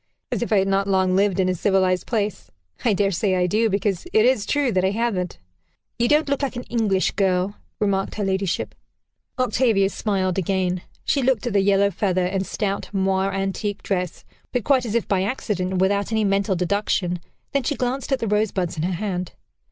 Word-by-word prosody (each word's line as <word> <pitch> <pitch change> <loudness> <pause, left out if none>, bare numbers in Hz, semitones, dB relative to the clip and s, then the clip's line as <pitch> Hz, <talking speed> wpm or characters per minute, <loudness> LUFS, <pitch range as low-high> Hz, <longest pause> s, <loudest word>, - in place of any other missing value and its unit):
"As - - -1
if 240 - -2
I 210 - +5
had 195 0 +2
not 195 0 +1
long 190 -1 +2
lived 195 -1 +2
in 185 - +3
a 185 - +2
civilized 185 0 +1
place. 210 -4 -2 0.3
I 230 - +3
dare 195 0 +1
say 190 +1 +1
I 180 -1 +2
do, 220 +5 +2
because 200 -2 -1
it 220 +1 +4
is 245 -5 +2
true 290 -4 +1
that 185 -3 +1
I 190 - +3
haven't." 200 -4 -1 0.6
"You 240 - +3
don't 300 +3 +3
look 280 0 0
like 275 -2 -2
an 245 - -4
English 210 -6 +1
girl," 190 0 0 0.2
remarked 195 -2 0
her 210 - -2
ladyship. 190 -1 -1 0.6
Octavia 230 -6 +2
smiled 190 -3 -1
again. 185 -1 0 0.2
She 280 - +2
looked 255 -2 +1
at 240 - -1
the 200 - +4
yellow 200 0 +3
feather 185 -1 0
and 190 +1 -1
stout 200 -1 -2
moire 195 0 +1
antique 195 +1 -2
dress, 180 -3 -3 0.3
but 245 -3 -1
quite 260 -4 +2
as 220 - -3
if 235 - 0
by 195 -2 +1
accident, 190 -3 -2
and 185 - 0
without 200 +3 +1
any 220 -1 +2
mental 195 0 +1
deduction; 180 -1 0 0.3
then 280 - +1
she 290 +4 -1
glanced 255 +2 -2
at 270 - +3
the 230 - -3
rosebuds 200 -5 0
in - - -1
her 180 +3 0
hand. 180 -1 -3
195 Hz, 205 wpm, -23 LUFS, 190-220 Hz, 0.6 s, I